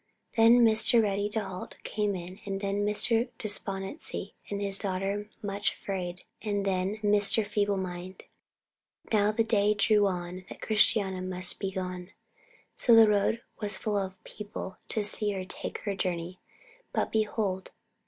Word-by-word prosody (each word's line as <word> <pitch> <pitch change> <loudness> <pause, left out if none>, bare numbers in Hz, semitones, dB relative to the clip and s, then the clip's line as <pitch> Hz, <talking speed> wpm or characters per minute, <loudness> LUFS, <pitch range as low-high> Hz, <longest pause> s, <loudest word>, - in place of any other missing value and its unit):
Then 235 +1 +7
Mr. 220 +1 +4
Ready 205 -1 +1
to 220 +1 -1
halt 190 -2 -7
came 210 -2 -1
in, 180 +1 -7
and 195 -1 -3
then 200 0 -1
Mr. 225 +3 +2
Despondency 200 +4 -3 0.2
and 200 - -2
his 200 -1 -1
daughter 200 +1 -2
Much 200 0 -1
afraid, 180 -2 -5 0.2
and 205 -2 -1
then 190 +2 0
Mr. 205 +1 +3
Feeble 205 -1 0
mind. 185 0 -6 0.9
Now 210 0 +4
the 225 +1 +2
day 210 -2 +3
drew 205 0 +4
on 180 0 -4
that - - -9
Christiana 205 -3 +2
must 185 -1 -1
be 195 -1 -2
gone. 180 -1 -5 0.6
So 235 - +5
the 225 -1 +9
road 210 +2 +2 0.2
was 205 -3 0
full 210 +2 -2
of 190 -2 -1
people 205 -2 -7
to 215 - 0
see 210 0 +3
her 190 -1 -4
take 185 - -4
her 205 - -2
journey. 180 -1 -3 0.5
But, - - 0
behold! 210 -3 -1
200 Hz, 155 wpm, -29 LUFS, 190-210 Hz, 0.9 s, the